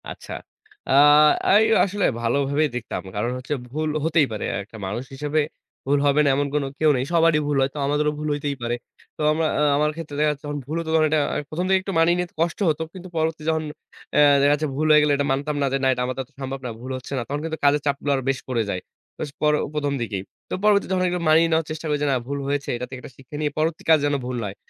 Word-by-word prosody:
আচ্ছা। - - -8 0.6
আ - - +1 0.7
এই - - +4 0.2
আসলে 200 +1 -1 0.2
ভালোভাবেই 140 +5 +1
দেখতাম। 125 -1 -4
কারণ 105 +4 -1
হচ্ছে 130 +4 -4 0.2
ভুল 155 +2 -2
হতেই 160 -2 +3
পারে। 105 - -3 0.2
একটা 110 +2 -13
মানুষ 105 +6 -3
হিসেবে 150 +3 -1 0.5
ভুল 140 +2 +2
হবে 145 +1 +3
না - - +4
এমন 145 +1 0 0.3
কেউ 155 - +4
নেই। 125 - 0
সবারই 165 -2 +4
ভুল 145 -1 +1
হয়। 135 - +2
তো - - -9
আমাদেরও 150 +1 +1
ভুল 150 - -3
হইতেই 145 -1 -2
পারে। 120 0 -1 0.4
তো - - -6
আমারা 155 0 +1
আ - - +3
আমার 150 +1 +2
ক্ষেত্রে 160 -3 -7
দেখা 150 0 +3
যাচ্ছে 145 0 -8
যখন 145 0 -3
ভুল 150 +4 -4
হত 165 - -5
তখন 160 - +4
এটা 155 0 +2 0.3
১ম 175 +4 -2
থেকে 190 0 +4
একটু 195 +1 -5
মানিয়ে 170 +2 +4
নিতে 180 -1 -3
কষ্ট 170 +1 0
হত। 155 - 0
কিন্তু 185 -1 -9
পরবর্তী 160 0 -1
যখন 160 0 0 0.5
আ - - +6 0.2
দেখা 140 +1 +4
যাচ্ছে 155 +1 -1
ভুল 155 +3 0
হয়ে 150 0 +7
গেলে 150 -1 +3
এটা 145 - 0
মানতাম 145 +3 -1
না - - +2
যে - - +3
না - - +4
এটা 125 - -3
আমার 130 0 -3
দ্বারা 130 -2 -5
সম্ভব 135 0 -4
না, - - -2
ভুল 130 +2 -6
হচ্ছে 130 - -11
না। - - -1
তখন 145 +3 -3
কিন্তু 160 -1 -3
কাজের 145 +1 +4
চাপগুলা 140 0 0
আর - - -2
বেশ 135 -1 0
পড়ে 120 -3 0
যায়। 90 - -2 0.4
বেশ 150 - -3
বড় 150 0 +4 0.2
১ম 145 -2 -1
দিকেই। 100 -5 -3 0.3
তো - - -5
পরবর্তী 205 -1 +4
যখন 180 -1 0
মানিয়ে 160 +2 +5
নেওয়ার 160 -1 +1
চেষ্টা 155 +1 -6
করি 150 - +1
যে - - +1
না - - +2
ভুল 140 +1 -3
হয়েছে, 140 0 -2
এটা 125 - -4
থেকে 130 0 -7
একটা - - -11
শিক্ষা 135 +2 -12
নিয়ে 150 -1 0
পরবর্তী 160 +1 -1
কাজ 160 - +8
যেন 145 0 +1
ভুল 125 0 -3
না - - -3
হয়। 95 - -7
150 Hz, 250 wpm, -23 LUFS, 135-160 Hz, 0.7 s, কাজ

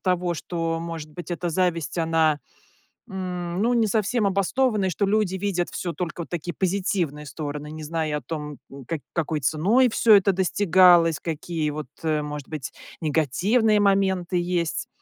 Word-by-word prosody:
того, 180 -2 0
что, 165 0 -3
может 165 -2 -6
быть, 175 +2 -9
это 175 0 -2
зависть, 170 -1 0
она, 160 -2 +2 0.7
м, 180 -1 -4
ну, 240 +2 +2
не 230 -2 +3
совсем 215 +1 +1
обоснована. 200 +2 +1
И - - +1
что 200 +3 0
люди 205 -2 +1
видят 185 -2 -1
всё 175 - -3
только, 175 -1 -4
вот, 165 - -7
такие 175 0 -4
позитивные 180 -6 -1
стороны, 150 +1 -6
не 155 0 -7
зная 155 -1 -2
о - - -6
том, 150 -3 -6
м, 135 -2 -10
как 160 0 -4
какой 160 -2 -1
ценой 195 - +3
все 220 -1 +5
это 195 0 +4
достигалось, 180 -3 +4
какие, 160 -1 -3
вот, 150 -2 -6 0.2
э, 155 -2 +1
может 150 -1 -6
быть, 155 -4 -6 0.3
негативные 190 - +2
моменты 190 -3 +2
есть. 175 -2 -1
175 Hz, 165 wpm, -24 LUFS, 155-190 Hz, 0.7 s, все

